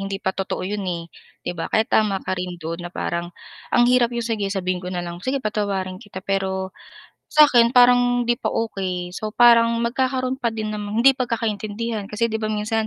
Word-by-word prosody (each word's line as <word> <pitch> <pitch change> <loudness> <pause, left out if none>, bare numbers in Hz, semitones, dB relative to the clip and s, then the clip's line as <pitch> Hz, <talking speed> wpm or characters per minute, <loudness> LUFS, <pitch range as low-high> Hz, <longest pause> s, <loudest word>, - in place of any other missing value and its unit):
hindi 195 0 -3
pa 190 - +1
totoo 195 -1 -3
yun, 205 +1 -3
eh, 170 -2 -4 0.3
'di - - -2
ba. 170 - -4
Kaya 220 - +3
tama 210 -3 +1
ka - - -2
rin 180 -1 -4
dun 165 +2 -4
na 175 - -6
parang, 170 0 -3 0.5
ang 240 - +6
hirap 245 -1 +3
yung 235 - -2
sige 220 -3 -1
sabihin 185 -2 -2
ko 180 - -6
na 180 -1 -3
lang, 170 0 -6
"Sige 265 +3 -2
patawarin 195 -3 -2
kita," 190 -2 -9
pero 190 -1 -1 0.6
sakin 250 -6 +6
parang 245 0 +5
hindi 240 0 0
pa - - -5
okay. 185 -5 -2
So 215 +3 -6
parang 235 -1 +5
magkakaroon 255 +2 -1
pa 235 -4 -1
din 215 -1 -3
namang 210 +2 -2
hindi 270 0 +5
pagkakaintindihan 220 -2 -2
kasi 230 +3 -1
'di 220 - -1
ba 215 - -2
minsan, 215 +1 -1
215 Hz, 200 wpm, -22 LUFS, 190-235 Hz, 0.6 s, ang